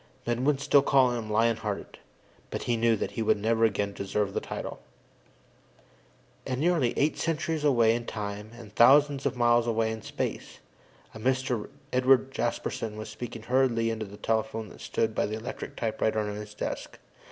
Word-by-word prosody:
Men 120 Hz, +2 st, -1 dB
would 145 Hz, -2 st, +3 dB
still 140 Hz, 0 st, +4 dB
call 135 Hz, -2 st, +4 dB
him 115 Hz, -3 st, -4 dB
"Lion 115 Hz, +1 st, +2 dB
hearted," 105 Hz, -3 st, -5 dB, 0.5 s
but -, -, -4 dB
he 120 Hz, -, +1 dB
knew 115 Hz, 0 st, +3 dB
that 100 Hz, -, -3 dB
he 105 Hz, -, -4 dB
would 110 Hz, -, +3 dB
never 115 Hz, +2 st, +2 dB
again 100 Hz, -2 st, 0 dB
deserve 100 Hz, 0 st, -2 dB
the -, -, 0 dB
title. -, -, -6 dB, 1.6 s
And, 130 Hz, -1 st, -3 dB
nearly 155 Hz, -7 st, +2 dB
eight 150 Hz, +2 st, +1 dB
centuries 160 Hz, -1 st, -1 dB
away 120 Hz, -6 st, +4 dB
in 120 Hz, 0 st, -3 dB
time 105 Hz, -1 st, -5 dB
and 110 Hz, -4 st, -12 dB
thousands 140 Hz, +3 st, +5 dB
of 125 Hz, -2 st, -3 dB
miles 120 Hz, 0 st, +3 dB
away 115 Hz, -1 st, +1 dB
in 110 Hz, 0 st, -5 dB
space, -, -, -4 dB, 0.6 s
a 110 Hz, -, -9 dB
Mr. 130 Hz, -1 st, 0 dB, 0.2 s
Edward 130 Hz, +1 st, +4 dB
Jasperson 115 Hz, -3 st, -3 dB
was 110 Hz, 0 st, -6 dB
speaking 115 Hz, 0 st, -7 dB
hurriedly 120 Hz, -2 st, +2 dB
into 110 Hz, -2 st, -4 dB
the 100 Hz, +1 st, -11 dB
telephone 110 Hz, -1 st, -1 dB
that -, -, -14 dB
stood 110 Hz, -1 st, -1 dB
by -, -, 0 dB
the 110 Hz, +1 st, -3 dB
electric 115 Hz, +3 st, -7 dB
typewriter 110 Hz, -1 st, -1 dB
on 105 Hz, -1 st, -1 dB
his 105 Hz, 0 st, -8 dB
desk. -, -, -5 dB
115 Hz, 175 wpm, -28 LUFS, 110-130 Hz, 1.6 s, thousands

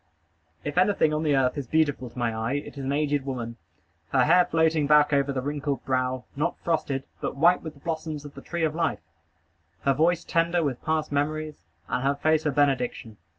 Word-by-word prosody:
If 145 Hz, +4 st, 0 dB
anything 185 Hz, -5 st, +3 dB
on 150 Hz, -, 0 dB
the 150 Hz, -3 st, +2 dB
earth 130 Hz, +1 st, +1 dB
is 135 Hz, -, -6 dB
beautiful 145 Hz, -4 st, +1 dB
to 115 Hz, -, -18 dB
my 115 Hz, -2 st, -1 dB
eye, 110 Hz, +3 st, -2 dB
it 145 Hz, +1 st, -4 dB
is 140 Hz, -, -6 dB
an 135 Hz, -, -1 dB
aged 145 Hz, -1 st, 0 dB
woman; 120 Hz, -4 st, -5 dB, 0.5 s
her -, -, +3 dB
hair 180 Hz, +3 st, +5 dB
floating 160 Hz, -2 st, +2 dB
back 150 Hz, 0 st, +5 dB
over 140 Hz, 0 st, +2 dB
the 130 Hz, -2 st, -3 dB
wrinkled 145 Hz, -1 st, -3 dB
brow, 130 Hz, -1 st, -1 dB
not 155 Hz, +5 st, -1 dB
frosted, 145 Hz, -5 st, -1 dB, 0.2 s
but -, -, -3 dB
white 170 Hz, +6 st, +4 dB
with 160 Hz, -2 st, -8 dB
the 140 Hz, -, -19 dB
blossoms 155 Hz, -2 st, -4 dB
of 145 Hz, -, -9 dB
the 140 Hz, -, -10 dB
tree 170 Hz, +2 st, -3 dB
of 155 Hz, -1 st, +1 dB
life; 165 Hz, -1 st, -1 dB, 0.8 s
her 140 Hz, -, +2 dB
voice 170 Hz, +4 st, +2 dB
tender 170 Hz, +1 st, +1 dB
with 135 Hz, -5 st, -3 dB
past 155 Hz, -2 st, -1 dB
memories, 155 Hz, +2 st, -1 dB, 0.3 s
and 125 Hz, -, -1 dB
her 140 Hz, +1 st, +2 dB
face 155 Hz, +2 st, +1 dB
a -, -, +2 dB
benediction. 130 Hz, -6 st, 0 dB
145 Hz, 205 wpm, -26 LUFS, 135-160 Hz, 0.8 s, hair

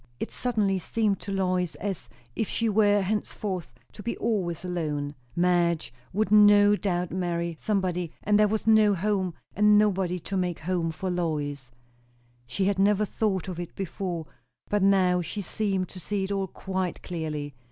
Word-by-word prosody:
It -, -, -4 dB
suddenly 210 Hz, -6 st, 0 dB
seemed 210 Hz, +2 st, 0 dB
to 200 Hz, -, -6 dB
Lois 185 Hz, -3 st, 0 dB
as 195 Hz, -4 st, -5 dB, 0.3 s
if 220 Hz, -, -1 dB
she 230 Hz, -, 0 dB
were 205 Hz, -1 st, +4 dB
henceforth 200 Hz, -2 st, -3 dB, 0.2 s
to -, -, -10 dB
be 235 Hz, +3 st, -3 dB
always 185 Hz, -7 st, -1 dB
alone. 150 Hz, -5 st, -2 dB, 0.2 s
Madge 175 Hz, -4 st, +2 dB, 0.2 s
would 210 Hz, +1 st, 0 dB
no 205 Hz, -1 st, +7 dB
doubt 180 Hz, -4 st, -1 dB
marry 170 Hz, -2 st, -2 dB
somebody; 180 Hz, -5 st, -1 dB
and 210 Hz, 0 st, +3 dB
there 210 Hz, -, +5 dB
was 215 Hz, +1 st, -2 dB
no 215 Hz, -2 st, +5 dB
home, 190 Hz, -2 st, -1 dB, 0.2 s
and 210 Hz, +1 st, +5 dB
nobody 190 Hz, -4 st, +2 dB
to 195 Hz, -, -5 dB
make 180 Hz, -2 st, -1 dB
home 170 Hz, 0 st, -1 dB
for 185 Hz, +3 st, -3 dB
Lois. 145 Hz, -6 st, -2 dB, 0.8 s
She 190 Hz, +10 st, -1 dB
had 195 Hz, -1 st, +1 dB
never 205 Hz, +1 st, +3 dB
thought 195 Hz, -3 st, -1 dB
of 180 Hz, -2 st, -5 dB
it 175 Hz, -1 st, -6 dB
before, 180 Hz, -3 st, -4 dB, 0.5 s
but 205 Hz, -1 st, +2 dB
now 185 Hz, -2 st, +4 dB
she 195 Hz, +5 st, -5 dB
seemed 195 Hz, 0 st, -1 dB
to 185 Hz, -, -9 dB
see 200 Hz, +2 st, -2 dB
it 190 Hz, -, -3 dB
all 195 Hz, -1 st, -1 dB
quite 190 Hz, -2 st, -4 dB
clearly. 150 Hz, -4 st, -4 dB
190 Hz, 165 wpm, -27 LUFS, 175-205 Hz, 0.8 s, no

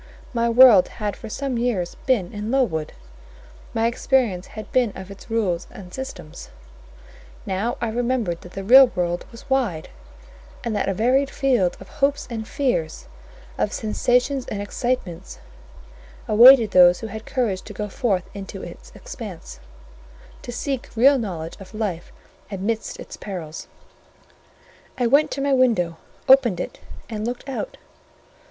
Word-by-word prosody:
My 235 Hz, -1 st, +1 dB
world 230 Hz, -5 st, +7 dB
had 210 Hz, -2 st, -2 dB
for 225 Hz, -, -9 dB
some 265 Hz, +1 st, -3 dB
years 215 Hz, -8 st, -1 dB
been 220 Hz, -9 st, +1 dB
in 210 Hz, +1 st, -5 dB
Lowood: 195 Hz, -, 0 dB, 0.8 s
my 225 Hz, 0 st, 0 dB
experience 235 Hz, -5 st, +1 dB
had 215 Hz, -2 st, -7 dB
been 245 Hz, -4 st, +2 dB
of 190 Hz, +1 st, -9 dB
its 200 Hz, -, -13 dB
rules 195 Hz, -6 st, -1 dB
and 180 Hz, -2 st, -12 dB
systems; 220 Hz, -11 st, -8 dB, 1.0 s
now 200 Hz, +6 st, -2 dB
I 235 Hz, -, -1 dB
remembered 235 Hz, -6 st, -1 dB
that 180 Hz, -, -13 dB
the 195 Hz, -, -5 dB
real 260 Hz, +6 st, +8 dB
world 175 Hz, -1 st, -2 dB
was 230 Hz, -, -13 dB
wide, 235 Hz, -, -1 dB, 0.7 s
and 230 Hz, -3 st, -2 dB
that 205 Hz, -, 0 dB
a 195 Hz, -, -1 dB
varied 260 Hz, +6 st, +2 dB
field 245 Hz, -12 st, +1 dB
of 190 Hz, -, -12 dB
hopes 285 Hz, -1 st, 0 dB
and 220 Hz, -1 st, -5 dB
fears, 245 Hz, -, -2 dB, 0.5 s
of 210 Hz, -, +1 dB
sensations 250 Hz, +5 st, 0 dB
and 205 Hz, -, -4 dB
excitements, 205 Hz, -4 st, -3 dB, 0.9 s
awaited 230 Hz, 0 st, +8 dB
those 180 Hz, -1 st, +6 dB
who -, -, -5 dB
had 220 Hz, 0 st, -8 dB
courage 215 Hz, -8 st, -1 dB
to -, -, -11 dB
go 210 Hz, +1 st, -4 dB
forth 200 Hz, -4 st, -1 dB
into 200 Hz, -1 st, -8 dB
its -, -, -11 dB
expanse, -, -, -9 dB, 0.8 s
to 245 Hz, -, -7 dB
seek 265 Hz, +1 st, -3 dB
real 270 Hz, +4 st, +5 dB
knowledge 170 Hz, -7 st, -5 dB
of 195 Hz, +2 st, -12 dB
life 195 Hz, -6 st, -3 dB, 0.4 s
amidst 210 Hz, +3 st, -3 dB
its -, -, -9 dB
perils. 165 Hz, -6 st, -7 dB, 1.3 s
I 250 Hz, -, +1 dB
went 280 Hz, +6 st, +4 dB
to 275 Hz, -, -4 dB
my 280 Hz, 0 st, +1 dB
window, 220 Hz, -11 st, +2 dB, 0.3 s
opened 255 Hz, -9 st, +5 dB
it, -, -, -5 dB, 0.3 s
and 215 Hz, -2 st, -5 dB
looked 245 Hz, +4 st, -4 dB
out. 275 Hz, -, -5 dB
225 Hz, 145 wpm, -22 LUFS, 190-255 Hz, 1.3 s, real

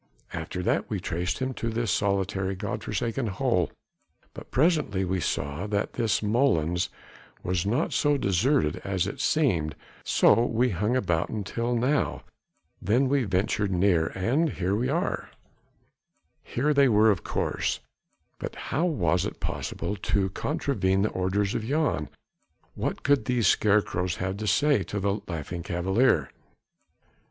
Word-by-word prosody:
"After 90 Hz, -, -4 dB
that -, -, 0 dB
we -, -, -2 dB
traced 90 Hz, +2 st, -2 dB
him 130 Hz, 0 st, -2 dB
to 115 Hz, -, -3 dB
this 115 Hz, -2 st, -1 dB
solitary 95 Hz, -1 st, 0 dB
God 100 Hz, +1 st, -4 dB
forsaken 115 Hz, +4 st, -2 dB
hole, 95 Hz, -, +1 dB, 0.6 s
but -, -, -10 dB
presently 135 Hz, -, +2 dB
we 95 Hz, +1 st, -1 dB
saw 75 Hz, +3 st, -2 dB
that 105 Hz, 0 st, -1 dB
this 115 Hz, -4 st, +1 dB
molens 95 Hz, -, +1 dB, 0.5 s
was 90 Hz, +1 st, -1 dB
not 125 Hz, +10 st, 0 dB
so 145 Hz, -1 st, +2 dB
deserted 100 Hz, -, +2 dB
as 95 Hz, -2 st, 0 dB
it 100 Hz, -, -5 dB
seemed, 85 Hz, -, +1 dB, 0.3 s
so 115 Hz, -, +4 dB
we 120 Hz, +1 st, +1 dB
hung 105 Hz, +7 st, 0 dB
about 90 Hz, -9 st, 0 dB
until 115 Hz, +3 st, -2 dB
now... 130 Hz, +5 st, 0 dB, 0.6 s
then 125 Hz, +8 st, +2 dB
we 140 Hz, -2 st, +2 dB
ventured 100 Hz, +1 st, 0 dB
nearer... 90 Hz, -3 st, +3 dB
and 135 Hz, -, +1 dB
here 95 Hz, +1 st, 0 dB
we 125 Hz, +4 st, 0 dB
are." 165 Hz, +5 st, -1 dB, 1.1 s
Here 145 Hz, +5 st, 0 dB
they 140 Hz, -2 st, +5 dB
were 110 Hz, 0 st, +5 dB
of 95 Hz, -, -2 dB
course, -, -, -1 dB, 0.6 s
but -, -, -5 dB
how 155 Hz, +8 st, -1 dB
was 90 Hz, -, +1 dB
it -, -, -5 dB
possible 85 Hz, +5 st, -3 dB
to 95 Hz, -1 st, 0 dB
contravene 100 Hz, -, 0 dB
the 105 Hz, -, +2 dB
orders 95 Hz, +2 st, 0 dB
of 110 Hz, -, -2 dB
Jan? 135 Hz, -, 0 dB, 0.6 s
What -, -, -3 dB
could 140 Hz, -1 st, +3 dB
these 125 Hz, -3 st, +1 dB
scarecrows 95 Hz, -4 st, +2 dB
have 95 Hz, +4 st, -3 dB
to 110 Hz, +1 st, -4 dB
say 135 Hz, +5 st, +3 dB
to 100 Hz, +3 st, -4 dB
the 100 Hz, +1 st, -1 dB
Laughing 85 Hz, 0 st, -5 dB
Cavalier? 90 Hz, -, +1 dB
100 Hz, 145 wpm, -27 LUFS, 90-125 Hz, 1.1 s, they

